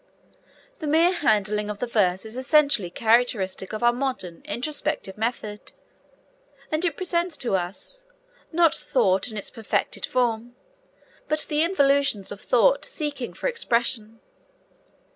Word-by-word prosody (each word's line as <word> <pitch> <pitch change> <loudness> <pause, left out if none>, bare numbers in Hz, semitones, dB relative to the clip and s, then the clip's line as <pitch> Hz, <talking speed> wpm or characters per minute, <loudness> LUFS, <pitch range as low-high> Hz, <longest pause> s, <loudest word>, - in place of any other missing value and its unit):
The 310 - -4
mere 325 +4 +4
handling 210 - +1
of 210 - -4
the 245 - -2
verse 195 -5 +1
is 220 +1 -9
essentially 260 - +3
characteristic 220 -3 +1
of 215 +2 -4
our 240 0 +5
modern 250 -9 -4
introspective 295 -6 -2
method, 215 -2 -4 1.0
as 310 +2 0
it 330 -5 0
presents 345 -2 -1
to 235 -6 0
us, 190 - -5 0.5
not 330 -2 +4
thought 195 -6 +1
in 215 - -7
its 200 - -4
perfected 225 -3 -2
form, 240 -1 -1 0.7
but 305 0 +1
the 300 0 +2
involutions 280 - +2
of 205 - -8
thought - - +3
seeking 295 - -4
for - - -9
expression. 235 - 0
245 Hz, 130 wpm, -24 LUFS, 210-305 Hz, 1.0 s, our